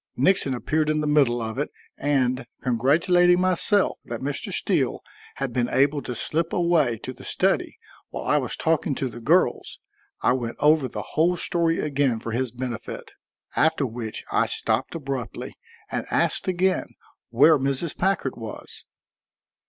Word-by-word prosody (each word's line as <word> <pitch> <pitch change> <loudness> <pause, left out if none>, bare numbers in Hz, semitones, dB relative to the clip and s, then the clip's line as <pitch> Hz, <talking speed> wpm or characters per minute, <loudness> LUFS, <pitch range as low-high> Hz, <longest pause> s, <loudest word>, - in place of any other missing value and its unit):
Nixon 140 -2 +3
appeared 150 +6 0
in 155 0 +1
the - - -1
middle 135 -6 +3
of 110 +3 -4
it, 145 - -1 0.3
and, 130 -3 0 0.2
congratulating 170 - +3
myself 185 +2 +2
that 120 -1 -5
Mr. 140 +1 -3
Steele - - 0 0.3
had 135 -3 -3
been 120 -1 0
able 140 +2 +2
to 125 -1 -5
slip 165 +8 -1
away 170 -9 +2
to 130 - -5
the - - -14
study - - 0 0.3
while - - -6
I - - +3
was - - -3
talking 160 -3 0
to 130 - -2
the 120 0 -10
girls, 160 +10 +1 0.4
I - - +4
went 120 -3 -3
over 150 -2 +4
the 105 -3 -6
whole 175 +3 +2
story 165 -2 +1
again 140 -5 0
for 115 - -6
his 125 +2 -1
benefit, 120 -1 -6 0.4
after 160 -3 +2
which 115 -2 -5
I - - +2
stopped - - -1
abruptly 135 -6 -5 0.4
and - - -3
asked - - 0
again 185 0 +1 0.4
where 145 +6 +5
Mrs. 140 +4 -1
Packard 190 -8 0
was. 110 -2 -9
140 Hz, 155 wpm, -24 LUFS, 125-165 Hz, 0.4 s, where